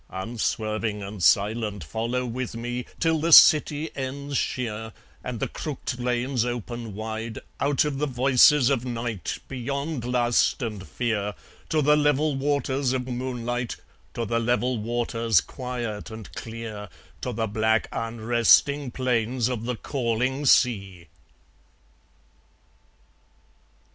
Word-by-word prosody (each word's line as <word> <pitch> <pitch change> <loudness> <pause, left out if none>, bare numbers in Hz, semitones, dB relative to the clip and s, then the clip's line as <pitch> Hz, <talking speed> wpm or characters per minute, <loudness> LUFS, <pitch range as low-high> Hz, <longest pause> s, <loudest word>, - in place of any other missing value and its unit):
Unswerving 110 +1 -2
and 100 0 -7
silent 105 +2 +2
follow 115 +9 -2
with 125 0 -4
me, 120 +1 -4
Till 160 -1 +2
the 165 +2 0
city 150 0 +7
ends 140 +2 -4
sheer, 110 -4 -2 0.3
And 125 -3 -4
the - - -1
crook'd 130 -4 -5
lanes 125 0 0
open 120 -2 -5
wide, 110 +1 -5 0.2
Out 145 +1 +2
of 140 -2 -2
the 150 - 0
voices 130 +1 +5
of 130 -4 +1
night, 115 -7 -3
Beyond 140 +2 -3
lust 120 +1 +2
and 105 -5 -5
fear, 105 -4 -2 0.3
To 155 -2 +2
the 150 +2 +5
level 145 0 +2
waters 135 -1 0
of 130 -1 -1
moonlight, 120 -1 -3 0.4
To 115 - -2
the 115 +1 0
level 120 +1 0
waters, 115 -2 +1
quiet 120 -5 -5
and 110 -1 -10
clear, 110 -3 -7 0.3
To 125 - -2
the 115 -1 -1
black 110 +1 +1
unresting 120 +5 +3
plains 125 -1 0
of 115 -3 -3
the 125 0 -1
calling 130 +3 -1
sea. 95 - +2
120 Hz, 125 wpm, -25 LUFS, 110-130 Hz, 0.4 s, city